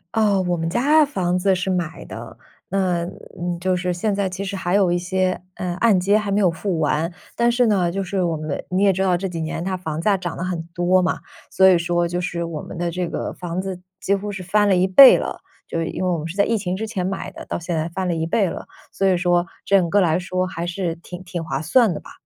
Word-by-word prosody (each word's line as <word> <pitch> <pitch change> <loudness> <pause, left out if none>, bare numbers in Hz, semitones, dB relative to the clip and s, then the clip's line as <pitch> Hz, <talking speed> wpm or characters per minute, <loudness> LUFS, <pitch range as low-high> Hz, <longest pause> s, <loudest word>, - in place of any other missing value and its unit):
哦， 205 -3 +3
我 175 - +1
们 165 -1 -2
的 - - -6
家 295 +7 +4
房 185 -11 0
子 190 +1 +2
是 185 +1 -1
买 175 -4 -2
的， - - -9 0.3
嗯， 185 -3 +1
呃， 175 -1 -6
就 185 +1 +1
是 180 0 -1
现 200 +4 -1
在 200 -1 0
其 190 +2 -5
实 200 0 -4
还 180 -2 -2
有 195 -2 +4
一 175 - +2
些， 185 +1 -1
呃， 180 -1 -3
按 220 -5 +5
揭 200 +3 +3
还 210 -2 -2
没 200 - +2
有 190 -3 +4
付 170 +1 -2
完。 155 +3 0 0.2
但 235 0 +3
是 245 +1 +3
呢， 185 -5 +2
就 195 +3 -2
是 190 0 -1
我 165 -2 0
们 155 -2 -4
你 185 +2 +1
也 195 -1 +5
知 190 - -2
道 185 -2 +2
这 190 +2 -3
几 170 -3 -5
年 160 +1 -3
它 190 0 -1
房 160 -4 -4
价 200 +4 +2
涨 180 -3 -4
得 - - -3
很 175 -3 -3
多 180 +2 +3
嘛， 180 - 0 0.3
所 190 - +5
以 185 -2 +6
说 175 0 0
就 175 +1 -2
是 170 -1 -3
我 160 -3 -5
们 - - -9
的 175 0 -1
这 175 0 -3
个 - - -4
房 175 +1 -4
子 190 -2 -6 0.2
几 200 - +1
乎 205 +1 -4
是 195 -2 -6
翻 205 +3 +2
了 190 - +4
1 185 +1 +3
倍 250 +8 +9
了， - - -4 0.3
就 - - -4
是 165 - -1
因 - - -5
为 - - +1
我 175 - +1
们 155 - -5
是 175 - -7
在 200 - +4
疫 230 - +1
情 185 -3 -3
之 220 +2 -3
前 195 -5 -3
买 195 +1 -3
的， - - -10
到 - - -3
现 170 0 -3
在 160 +1 -1
翻 185 +2 -3
了 175 - 0
1 160 0 -1
倍 190 +3 +1
了， - - -7 0.3
所 195 - -1
以 190 -2 +4
说 175 0 +2 0.2
整 190 -4 +3
个 205 - +3
来 170 -4 +3
说 185 0 -2
还 170 -2 -4
是 175 -1 -2
挺 175 +1 -10
挺 175 -2 -4
划 135 -3 -3
算 210 +5 +3
的 - - -5
吧。 - - -14
180 Hz, 290 characters per minute, -21 LUFS, 175-195 Hz, 0.3 s, 倍